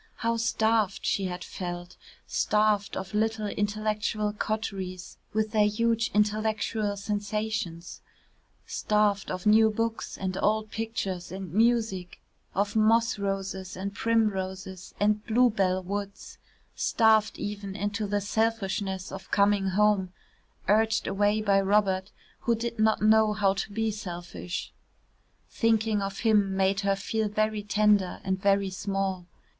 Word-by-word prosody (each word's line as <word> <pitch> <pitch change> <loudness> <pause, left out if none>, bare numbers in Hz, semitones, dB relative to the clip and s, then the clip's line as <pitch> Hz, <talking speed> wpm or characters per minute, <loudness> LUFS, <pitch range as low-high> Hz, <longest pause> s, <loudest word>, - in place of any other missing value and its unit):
How 230 0 -1
starved 220 -2 +1
she 195 - +1
had 180 -1 -4
felt 175 -1 -6 0.3
starved 210 -1 +1
of 190 +2 -6
little 220 0 0
intellectual 210 0 -1
coteries 195 -4 -4
with 215 0 0
their 210 -2 +4
huge 230 +1 +1
intellectual 215 0 0
sensations 205 -4 -3 0.6
starved 210 -2 +1
of 185 -1 -4
new 220 +1 +6
books 225 +1 -3
and 185 -1 -3
old 215 +1 +1
pictures 195 -6 -4
and 190 -3 -7
music, 220 -5 +1 0.4
of 200 +2 0
moss 225 0 +3
roses 195 -2 -3
and 195 +1 -4
primroses 190 -4 -1
and 210 +1 +2
bluebell 210 -6 +2
woods, 200 +1 -6 0.3
starved 220 -2 +3
even 200 -1 -5
into 205 +1 -2
the 205 0 0
selfishness 200 -3 -1
of - - -8
coming 200 -1 +3
home, 195 -1 +2 0.6
urged 220 +2 +3
away 205 +2 +1
by 200 -2 +3
Robert, 195 -1 +1 0.3
who 235 - +1
did 230 0 -4
not 220 -1 +3
know 215 0 +5
how 200 -2 +2
to 195 +1 -4
be 225 +1 0
selfish. 180 -3 -6 0.8
Thinking 220 -2 +1
of 195 0 -4
him 205 -4 +3
made 195 +1 +2
her 200 -1 +1
feel 215 +2 -2
very 215 0 0
tender 205 -2 +2
and 190 -1 -2
very 200 -1 +2
small. 190 -1 -2
205 Hz, 130 wpm, -27 LUFS, 195-220 Hz, 0.8 s, new